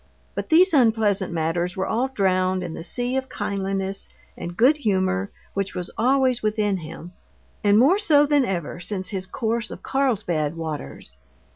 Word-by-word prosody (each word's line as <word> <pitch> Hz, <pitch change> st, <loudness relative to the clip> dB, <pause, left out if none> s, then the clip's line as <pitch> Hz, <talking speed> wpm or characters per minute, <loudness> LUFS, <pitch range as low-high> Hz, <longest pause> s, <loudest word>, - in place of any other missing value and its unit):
But -, -, -5 dB
these 355 Hz, +2 st, +5 dB
unpleasant 220 Hz, -, +3 dB
matters 170 Hz, +2 st, -1 dB
were 190 Hz, -, 0 dB
all 240 Hz, +4 st, 0 dB
drowned 185 Hz, -6 st, +1 dB
in 170 Hz, -2 st, -5 dB
the 165 Hz, -, -7 dB
sea 245 Hz, +7 st, -1 dB
of 265 Hz, 0 st, -3 dB
kindliness 195 Hz, -1 st, -3 dB, 0.3 s
and 175 Hz, +1 st, -7 dB
good 270 Hz, +6 st, +5 dB
humor 195 Hz, -5 st, 0 dB, 0.2 s
which 195 Hz, -1 st, -2 dB
was 180 Hz, -1 st, -4 dB
always 255 Hz, 0 st, +2 dB
within 210 Hz, -2 st, 0 dB
him, 170 Hz, +1 st, -9 dB, 0.5 s
and 205 Hz, 0 st, +5 dB
more 295 Hz, -, +5 dB
so 300 Hz, -8 st, +5 dB
than 290 Hz, -1 st, +3 dB
ever 175 Hz, -6 st, -3 dB
since 185 Hz, +1 st, -3 dB
his 190 Hz, -2 st, -4 dB
course 230 Hz, +2 st, -2 dB
of -, -, -9 dB
Carlsbad 190 Hz, -, 0 dB
waters. 150 Hz, -, -6 dB
200 Hz, 160 wpm, -23 LUFS, 185-245 Hz, 0.5 s, these